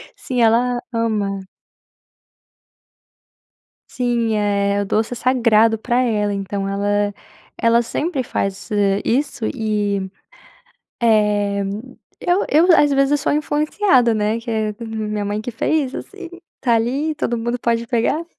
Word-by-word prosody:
sim, 250 -2 -3
ela 240 +2 +3
ama. 205 -4 -1 2.5
Sim, 240 -3 0
é 200 -1 +1
o - - -5
doce 220 +4 0
é - - -5
sagrado 230 -3 +3
para 240 +2 0
ela, 215 -5 +1
então 195 0 -3
ela 205 +1 0 0.5
ela 230 0 +3
sempre 290 +5 -2
faz 195 -4 -3 0.3
isso 265 -2 -1
e, 205 -4 -1 1.0
eh 210 -3 +2 0.6
eu 355 +3 +1
eu 310 +3 +4
às 295 -2 +4
vezes 275 0 +2
eu 290 - +3
sou 285 - -1
a - - +2
influenciada, 300 - +2
né, 215 +2 0
que 230 +1 -7
é 215 -1 -1
minha 215 -2 -3
mãe 205 +1 -3
que 245 - -4
fez, 265 +3 -1
assim, 390 -4 -8 0.3
tá 240 -3 +3
ali, 270 +7 -1
todo 240 -4 -2
mundo 235 +2 -2
pode 235 0 0
pegar. 245 +7 0
230 Hz, 135 wpm, -20 LUFS, 210-255 Hz, 2.5 s, eu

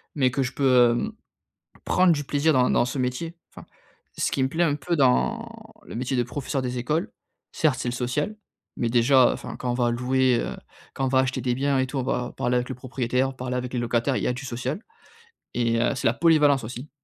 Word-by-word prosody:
mais 130 -4 +3
que 135 +1 0
je 125 - -4
peux, 140 - -3
heu, 125 - +4 0.7
prendre 180 -2 +4
du 145 -2 -2
plaisir 145 +3 +1
dans 125 -2 +3
dans - - +3
ce 125 +2 -4
métier. 130 +7 -2 0.2
Enfin, - - -12 0.5
ce - - 0
qui 135 - +1
me 130 - +1
plaît 165 +5 +1
un 145 -3 +1
peu 170 +4 -2
dans 225 - +2 0.4
le - - -9
métier 125 +2 -2
de 120 - +2
professeur 130 +3 -3
des 125 0 -3
écoles, 160 - -1 0.4
certes, 145 -5 +1
c'est 125 - -3
le - - -3
social, 125 - -2 0.4
mais 120 - 0
déjà 125 +2 +5
enfin - - -7
quand 125 - -2
on - - 0
va 120 -1 +1
louer, 125 0 +2
heu, - - -4 0.4
quand 135 - -1
on - - 0
va 130 0 +3
acheter 130 0 0
des 125 0 0
biens 140 +1 +1
et 130 - +1
tout, 135 - -5
on - - -1
va 125 -1 -2
parler 125 0 0
avec 125 0 -1
le 130 - -4
propriétaire, 125 +1 -1
parler 125 0 -4
avec 125 0 -4
les 125 - 0
locataires. 120 +3 0
Il - - -3
y - - +1
a - - +1
du 130 +3 -7
social, 125 - -4 0.7
et 115 -1 +1
heu, 130 - +1
c'est 125 - 0
la 115 - +3
polyvalence 150 -3 +4
aussi. 125 +5 -8
130 Hz, 235 wpm, -25 LUFS, 125-140 Hz, 0.7 s, déjà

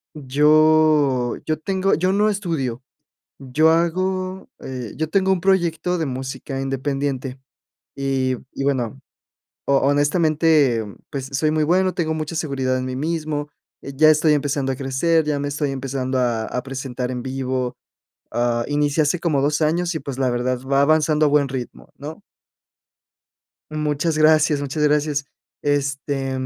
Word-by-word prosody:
yo 150 -2 +3
yo 155 -1 -1
tengo, 190 +3 0
yo 185 +3 +2
no 205 +2 +2
estudio. 160 - -2 0.6
Yo 140 +4 +2
hago, 185 +3 -1
eh, 125 -4 -6
yo 160 0 -2
tengo 190 +1 +2
un 185 -3 +1
proyecto 180 -2 +1
de 160 - -1
música 135 +1 -5
independiente. 135 -1 -3 0.6
Y 135 -2 0 0.2
y - - -4
bueno, 135 -2 -1 0.7
ho 140 - +3
honestamente, 145 -2 +3 0.3
pues 135 -2 -4
soy 150 +3 +1
muy 155 0 +1
bueno, 185 +3 +2
tengo 160 -3 -1
mucha 155 0 -4
seguridad 135 -5 -1
en 130 - -3
mí 130 0 -4
mismo. 155 0 -3 0.3
Eh, 140 - -7
ya 155 +3 +5
estoy 155 0 +4
empezando 140 -2 0
a - - -5
crecer, 145 +5 +1
ya 150 -1 -1
me 145 0 -2
estoy 145 0 -2
empezando 135 -1 -2
a 120 -3 0
a 125 - -3
presentar 130 -1 -4
en 125 -1 -4
vivo, 130 -1 -3 0.5
ah, 120 0 0
inicié 145 +1 +1
hace 150 +4 +1
como 160 -5 0
2 145 +2 +1
años 170 +3 +1
y, - - -1
pues, 135 -1 -6
la 130 -1 +1
verdad 125 +1 -1
va 140 0 +4
avanzando 155 +1 +3
a - - +3
buen 145 -1 +3
ritmo, 120 - -7
¿no? - - -9 1.5
Muchas 155 +1 -1
gracias, 155 -1 +4
muchas 145 +2 -2
gracias. 150 -1 +1 0.4
Este, 140 -1 -1
145 Hz, 150 wpm, -21 LUFS, 130-155 Hz, 1.5 s, ya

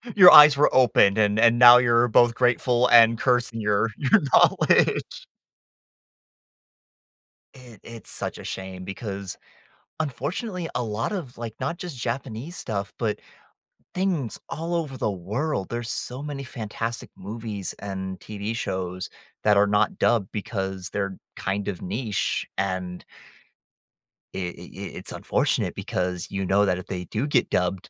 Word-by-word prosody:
Your 180 -3 +10
eyes 150 -1 +9
were 150 - +3
opened, 110 -5 +4
and 105 -1 +2
and 115 +1 +4
now 120 0 +10
you’re 120 -1 +3
both 120 +1 +4
grateful 125 0 +2
and 115 -1 +6
cursing 125 -2 0
your 105 +2 +1
your 135 - +3
knowledge. - - +3 2.3
It 125 -5 -15
it’s 115 -1 -11
such - - -5
a - - -10
shame 95 -1 -7
because, 100 -1 -6 0.6
unfortunately, 165 - -4
a 125 - 0
lot 110 - -3
of, 155 - -6
like, 115 -2 -7
not 140 +6 -3
just 170 -7 -7
Japanese 125 +6 -5
stuff, 100 -3 -4
but 110 -3 -2 0.8
things 180 - -2
all 165 +2 -4
over 150 -6 -3
the 110 - -1
world, 100 - -3
there's 120 -1 -4
so 125 +6 -5
many 145 -2 -5
fantastic 115 -1 -6
movies 105 -1 -6
and 95 -2 -6
TV 105 +2 -5
shows 90 -3 -4 0.4
that 105 -1 +4
are 100 +1 +5
not 105 - +1
dubbed 105 -5 +1
because 95 -3 -4
they’re 100 -2 -3 0.2
kind 100 +1 -3
of 95 -4 -4
niche, 105 +2 -2
and 95 -2 -3 1.3
i - - -3 0.2
i - - -9 0.2
i - - -4
it’s - - -6
unfortunate - - -1
because, 90 0 -3
you 95 -1 -2
know, 100 +2 +3
that 90 -2 0
if 90 +2 -9
they 90 -2 -5
do 110 +9 -3
get 135 -4 +1
dubbed, 90 +1 -1
115 Hz, 145 wpm, -24 LUFS, 100-125 Hz, 2.3 s, Your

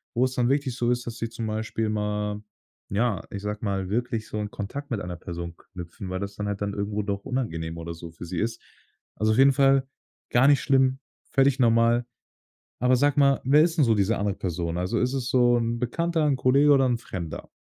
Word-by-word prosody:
wo's 130 +2 +1
dann 120 -1 +2
wirklich 140 -3 0
so 120 -1 0
ist, 120 0 -1
dass 115 0 -5
sie 115 - -2
zum 115 -1 -5
Beispiel 110 0 -2
mal 105 0 -2 0.5
ja, 105 +1 0
ich 100 - -5
sage 105 0 -3
mal, 95 -2 -2
wirklich 115 0 -2
so - - -4
'n 105 -1 -3
Kontakt 140 +8 -6
mit 110 -4 -1
einer 90 -1 -5
Person 85 -1 -7 0.2
knüpfen, 90 +1 -8
weil 95 0 -3
das 100 0 -5
dann 105 - -4
halt 100 -1 -3
dann 100 0 -1
irgendwo 100 +1 -2
doch 100 -1 -4
unangenehm 85 -11 -3
oder 85 0 -6
so 85 0 -10
für 80 - -11
sie 85 0 -4
ist. 115 +1 -2 0.5
Also, 110 +1 +1
auf - - 0
jeden 135 +1 +7
Fall 135 0 +4 0.5
gar 120 +3 +5
nicht 145 -1 +5
schlimm, 135 -1 +2 0.3
völlig 135 0 +3
normal. 115 0 +3 0.7
Aber 125 +1 +4
sag 145 +2 +2
mal, 140 -1 +4
wer 145 +3 +6
ist 170 0 0
'n 145 - +5
so 115 - +4
diese 105 +3 +1
andere 100 -1 -1
Person? 85 -2 -3
Also, 90 +1 -1
ist 125 +2 0
es 130 -2 -2
so 120 -1 +4
'n 115 0 -1
Bekannter, 165 +6 0
'n 140 -3 +2
Kollege 140 +3 +4
oder 135 -2 +5
'n 120 -1 +1
Fremder? 85 -8 -7
115 Hz, 220 wpm, -25 LUFS, 100-130 Hz, 0.7 s, jeden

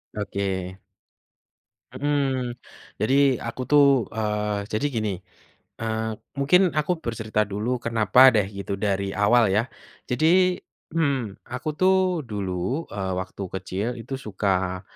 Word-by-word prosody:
Oke. 95 -2 -3 1.1
Mmm, 135 -4 -1 0.5
jadi 135 +2 +4
aku 120 +2 -5
tuh, 145 -1 +6 0.3
eee, 105 -1 -1
jadi 110 +7 -1
gini, 110 -2 0 0.7
eee, 110 0 -2 0.3
mungkin 145 +7 +5 0.2
aku 150 +4 0
bercerita 110 -2 -1
dulu 105 +4 -2 0.2
kenapa 115 -1 +2 0.2
deh 100 -2 +2
gitu 100 0 -4
dari 100 0 0
awal 110 +3 +4
ya, 110 - +3 0.5
jadi, 180 +7 +3 0.4
mmm, 135 -10 -1
aku 130 +4 -3
tuh 190 +1 +5 0.4
dulu, 100 - -3
eee, 95 -2 -3
waktu 95 +1 -6
kecil 95 +3 -3
itu 135 - -8
suka, 95 -2 -1
110 Hz, 115 wpm, -24 LUFS, 100-135 Hz, 1.1 s, tuh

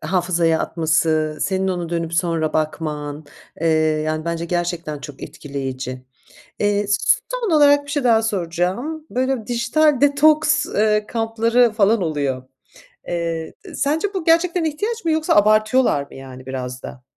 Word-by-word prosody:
hafızaya 170 -1 +1
atması, 155 -1 0
senin 190 0 0
onu 175 -2 -2
dönüp 170 -1 -3
sonra 165 -2 0
bakman, 150 -1 -3 0.4
eee, 165 - 0 0.4
yani 155 0 -2
bence 170 0 -2
gerçekten 170 -3 -3
çok 145 -1 -10
etkileyici. 130 -2 -6 0.6
Eee, 205 0 +1
s 205 0 +2
son 475 -7 -2
olarak 285 -1 +5
bir 285 - -7
şey 285 -2 -1
daha 225 -2 +4
soracağım. 200 - -2
Böyle 255 -3 -1
dijital 275 +4 +2
detoks, 300 +1 +4
eee, 210 0 +1
kampları 230 +1 +2
falan 215 0 +2
oluyor. 140 -6 -2 0.7
Eee, 165 -2 -3 0.2
sence 320 +9 -1
bu 370 -4 -3
gerçekten 335 +1 +2
ihtiyaç 415 +9 -3
mı 330 - +1
yoksa 315 0 +1
abartıyorlar 215 - +3
mı, 140 - -14
yani 130 -1 -11
biraz 125 -1 -5
da? 125 - -9
190 Hz, 140 wpm, -20 LUFS, -, 0.7 s, olarak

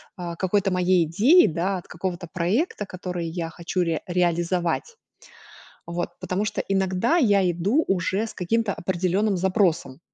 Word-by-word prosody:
а, 170 -2 -6
какой-то 195 +2 +1
моей 180 -1 +3
идеи, 230 - +5
да, 180 +4 -1
от - - -15
какого-то 175 0 -4
проекта, 205 - 0
который 180 -2 -5
я 165 0 -4
хочу 170 +2 -3
ре 165 -2 0
реализовать, 175 - 0 0.9
вот. 170 +1 -3
Потому 185 +3 -2
что 210 - -2
иногда 195 - +1
я 200 - +3
иду 200 - +1
уже 195 +3 0
с 225 - -8
каким-то 205 +3 0
определенным 190 +3 0
запросом. 175 -7 0
185 Hz, 140 wpm, -24 LUFS, 175-200 Hz, 0.9 s, идеи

